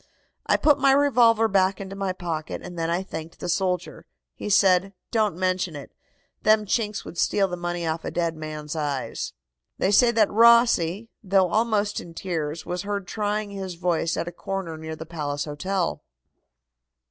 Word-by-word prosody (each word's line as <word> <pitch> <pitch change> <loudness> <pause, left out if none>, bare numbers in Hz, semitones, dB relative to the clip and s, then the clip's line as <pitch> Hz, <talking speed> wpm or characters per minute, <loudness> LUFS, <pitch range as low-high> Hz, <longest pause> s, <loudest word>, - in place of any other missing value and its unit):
I - - +4
put 295 -2 +4
my 270 -1 +5
revolver 240 -5 +4
back 190 -1 +2
into 195 0 -7
my 195 -1 -1
pocket, 165 -4 -5
and 180 0 -8
then 165 -1 -2
I 175 +3 0
thanked 160 -2 -8
the - - -5
soldier. 180 0 -2 0.3
He - - -6
said: 195 -1 +4 0.2
'Don't 215 -6 +1
mention 185 -2 -1
it. 140 - -9 0.5
Them 215 0 +4
Chinks 210 0 -1
would 170 - -7
steal 195 -1 +2
the 180 - -4
money 175 -1 -3
off 160 0 -2
a - - -3
dead 170 -2 -1
man's 155 -1 -6
eyes.'" 145 - -3 0.4
They 190 - +1
say 240 +4 +6
that 225 -3 +3
Rossi, 230 -3 +4
though 190 -2 +3
almost 215 -1 +1
in 165 -1 -12
tears, 160 -3 -3
was 180 0 -3
heard 200 -1 -3
trying 210 +1 -2
his 190 -3 -5
voice 170 -1 0
at - - -2
a - - -4
corner 190 -2 -5
near 160 0 -6
the 160 - -8
Palace 145 -3 -3
Hotel. 175 +4 -2
185 Hz, 175 wpm, -25 LUFS, 165-205 Hz, 0.5 s, say